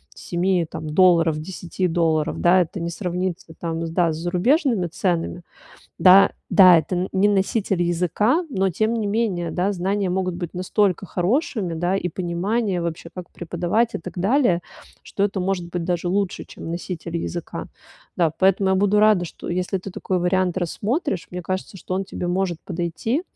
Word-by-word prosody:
7 175 0 0
там 155 - -6
долларов, 165 -2 +4
10 180 +2 -3
долларов, 160 -2 0
да, 180 +1 +5
это 175 +3 -3
не 170 0 -3
сравнится 180 -2 -4
там, 165 0 -3
с - - -4
да 165 0 +2
с - - -5
зарубежными 195 - +1
ценами. 175 0 -2 0.6
Да, 190 +1 +7 0.2
да, 185 -3 +8
это 160 +4 -3
н 180 +2 -1
не 195 +2 +3
носитель 195 -2 +1
языка, 180 - +1
но 195 -6 +1
тем 215 +5 0
не 225 -3 -1
менее, 200 -6 -1
да, 190 +3 0
знания 195 +1 -1
могут 185 -1 -1
быть 175 -2 -5
настолько 190 +1 0
хорошими, 195 - -1
да, 175 +4 0
и 180 - -2
понимание 185 +3 -1
вообще, 170 0 -4
как 180 -1 -8
преподавать, 175 +7 -1
и - - -1
так 180 +2 -8
далее, 200 -2 +2 0.4
что 200 - -4
это 200 -1 -1
может 180 -2 -2
быть 175 -1 -3
даже 175 0 -1
лучше, 195 0 -1
чем 165 - -9
носитель 170 -1 -5
языка. 170 0 -5 0.5
Да, 170 -3 +3
поэтому 190 0 +3
я - - +3
буду 205 +2 +3
рада, 210 -4 +4
что - - -9
если 180 +2 -1
ты 190 +2 -8
такой 185 0 -2
вариант 180 +1 +1
рассмотришь, 210 - -2
мне 180 - -5
кажется, 185 +2 -4
что 185 - -5
он 195 - -1
тебе 180 - -5
может 175 -1 -1
подойти, 180 - -2
180 Hz, 175 wpm, -22 LUFS, 175-195 Hz, 0.6 s, да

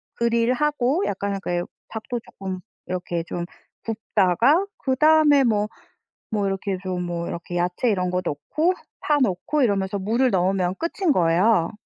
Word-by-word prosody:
그릴 235 +1 +2
하고 295 +4 +1
약간 200 +1 -2
약간 190 -3 -3
요 175 - -1 0.2
닭도 230 +2 -5
쪼끔 190 -4 -7 0.3
이렇게 175 -2 -3
좀 175 +1 -4 0.4
굽다가 225 - +2
그다음에 295 +1 +4
뭐 210 -3 +2 0.6
뭐 205 -2 0
이렇게 195 0 -2
좀 185 -1 -2
뭐 170 -1 -3
이렇게 170 +1 -6
야채 180 +7 0
이런 180 -4 0
거 180 0 0
넣고 310 - 0 0.3
파 295 - +2
넣고 255 +5 +1
이러면서 200 -3 +1
물을 230 +7 +1
넣으면 185 -2 +1
끝인 340 +1 0
거예요. 175 - +3
200 Hz, 295 characters per minute, -23 LUFS, 180-255 Hz, 0.6 s, 그다음에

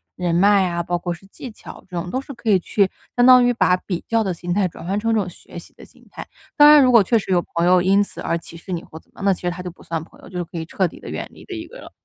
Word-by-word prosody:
人 175 -2 -1
脉 195 +1 +4
啊， 170 -1 -2
包 175 +1 -1
括 175 0 -4
是 170 +3 -14
技 245 +5 -10
巧， - - -13
这 180 - -9
种 175 +1 -6
都 255 - -2
是 280 - -10
可 230 -2 -5
以 195 -3 +5
去， 195 +2 +1 0.3
相 245 - +4
当 250 -1 +8
于 245 - +3
把 180 -6 +3
比 180 -1 -5
较 230 -1 +1
的 190 -3 -2
心 175 +1 -4
态 195 0 +1
转 165 - -11
换 195 +3 -1
成 225 +1 0
这 220 - +2
种 190 -3 -3
学 175 - -11
习 - - -16
的 - - -15
心 - - -23
态。 - - -8 0.3
当 295 0 +8
然 300 -1 +8
如 255 - +4
果 230 -4 +6
确 230 +4 +2
实 195 - -6
有 175 -1 +2
朋 170 0 +2
友 180 0 +5
因 195 +3 +3
此 - - -11
而 165 - -1
歧 170 0 -11
视 180 +3 -10
你 175 -2 -3
或 160 - -12
怎 - - -30
么， - - -13
那 195 -1 +3
其 - - -9
实 175 - -1
她 180 +1 -7
就 180 - -6
不 175 - -19
算 165 -2 -4
朋 - - -19
友， - - -13
就 180 - -7
是 175 - -1
可 170 - -10
以 160 - -4
彻 185 +3 0
底 - - -13
地 - - -10
远 - - -5
离 - - -16
的 380 - -8
一 330 0 -7
个 - - -13
了。 - - -12
185 Hz, 370 characters per minute, -21 LUFS, 175-220 Hz, 0.3 s, 当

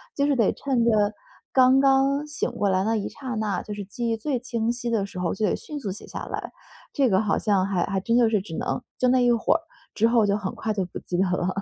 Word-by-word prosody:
就 280 0 +1
是 285 - +2
得 230 -6 +3
趁 260 -4 0
着 215 -3 +3 0.4
刚 260 0 +6
刚 275 +2 +3
醒 295 -4 -2
过 215 -4 -1
来 190 0 +2
那 225 +3 +1
一 205 - -2
刹 270 -3 -8
那， 210 -4 -1
就 210 - -6
是 205 -1 -6
记 230 +4 -3
忆 225 - 0
最 255 +3 -1
清 235 -2 -2
晰 240 0 -2
的 220 -4 +1
时 200 - -10
候 180 -2 -1
就 215 - -1
得 - - +1
迅 300 -1 -7
速 215 - -4
写 - - -11
下 - - -7
来， - - -5 0.4
这 270 -4 +2
个 190 0 +3
好 210 -2 +1
像 195 -3 +2
还 190 -3 0
还 195 -1 -2
真 230 +4 +1
就 240 -2 +5
是 215 -3 +1
只 170 -5 -7
能 - - -2 0.2
就 255 - +2
那 255 0 +4
一 245 -1 +4
会 230 +5 +2
儿 330 - 0 0.3
之 225 +2 +3
后 230 -3 +4
就 200 0 +2
很 195 -2 -4
快 215 0 -2
就 200 -2 -1
不 175 - -8
记 180 - -5
得 185 - +3
了。 180 0 0
225 Hz, 295 characters per minute, -25 LUFS, 200-255 Hz, 0.4 s, 刚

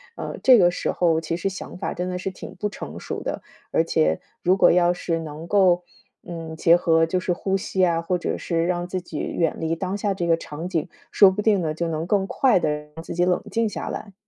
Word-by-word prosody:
呃， - - -5
这 255 -2 +7
个 175 -4 +5
时 - - -2
候 165 -2 +2
其 165 +1 -3
实 195 - -1
想 190 -1 -8
法 - - -3
真 180 +1 -3
的 180 - -3
是 185 +1 -4
挺 185 - -10
不 210 +3 -2
成 205 - -8
熟 - - -5
的， - - -4 0.3
而 - - +3
且 80 +1 +1 0.2
如 185 +2 +3
果 - - +6
要 175 0 +4
是 170 -1 -2
能 155 0 -7
够， 180 -2 +4 0.4
嗯， 165 -2 -6
结 165 +1 +5
合 165 -2 +3
就 180 +3 -1
是 180 - -2
呼 190 +2 -1
吸 190 -1 +1
啊， 165 -1 +1
或 180 +2 -1
者 175 - -3
是 165 -1 -1
让 175 0 -1
自 185 +1 -3
己 165 -3 -7
远 165 -2 -1
离 165 0 -1
当 185 +3 -3
下 205 -1 -1
这 175 - -2
个 165 -1 +4
场 165 +1 -7
景， 175 -1 -2 0.2
说 200 - +7
不 200 +2 -3
定 205 -3 +3
呢， 155 -2 -2
就 170 +1 -2
能 160 +1 -3
更 195 0 +2
快 260 +5 +3
地 155 - 0 0.2
让 165 - -8
自 - - -6
己 175 +1 +1
冷 180 0 +1
静 230 -1 +1
下 - - -5
来。 200 - -6
175 Hz, 265 characters per minute, -23 LUFS, 165-190 Hz, 0.4 s, 这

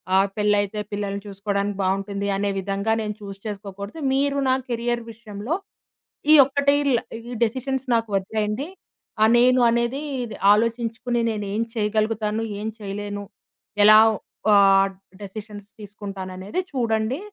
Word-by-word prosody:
ఆహ్, 195 +1 +4
పెళ్లైతే 205 0 +1
పిల్లల్ని 200 -1 -3
చూసుకోవడానికి 200 0 -2
బావుంటుంది 195 +1 -1
అనే 200 0 0
విధంగా 200 +3 -1
నేను 210 -1 -3
చూజ్ 195 -1 -8
చేసుకోకూడదు. 200 +5 -7
మీరు 280 +1 +1
నా - - +4 0.2
కెరియర్ 240 0 -1
విషయంలో 220 +6 -5 0.8
ఈ - - +10
ఒక్కటి 280 +1 +2 0.2
ల 235 - +2 0.3
ఈ - - -6
డెసిషన్స్ 260 +3 -1
నాకు 225 -1 +1
వదిలేయండి. 210 +6 -1 0.5
ఆ! - - +7
నేను 250 +1 +5
అనేది 235 +4 0 0.5
ఆలోచించుకొని, 230 +2 0
నేను 210 -1 -4
ఏం 220 - 0
చేయగలుగుతాను 215 0 0 0.2
ఏం 215 - -4
చేయలేను, 205 0 -5 0.6
ఎలా 215 0 +9 0.6
ఆహ్, 195 -1 +5 0.3
డెసిషన్స్ 205 0 -8
తీసుకుంటాననేది 195 - -5
చూడండి. 230 0 0
210 Hz, 120 wpm, -23 LUFS, 200-235 Hz, 0.8 s, ఈ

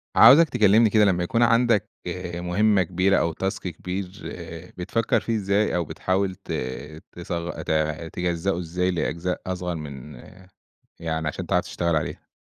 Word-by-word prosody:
عاوزك 160 +4 +8
تكلمني 110 +2 +5
كده 105 0 +4
لمّا 90 -3 +2
يكون 115 +7 0
عندك 115 -3 +3 0.5
مهمة 95 +3 +2
كبيرة 95 +3 +2
أو 85 - +1
task 95 +4 -2
كبير 90 +3 -4 0.7
بتفكّر 100 +6 0
فيه 115 - -2
إزاي 100 -1 +1
أو 85 -1 0
بتحاول 95 +3 -1
ت - - -11 0.6
تصغ 85 0 -5
ت - - -4 0.4
تجزّؤه 90 +1 -1
إزاي 90 +2 -1
لأجزاء 85 +1 -2
أصغر 90 -1 -3
من 75 -2 -8 0.8
يعني 80 -1 -2
عشان 75 - -4
تعرف - - +1
تشتغل 85 -1 -1
عليه. 75 - -3
90 Hz, 140 wpm, -24 LUFS, 85-100 Hz, 0.8 s, عاوزك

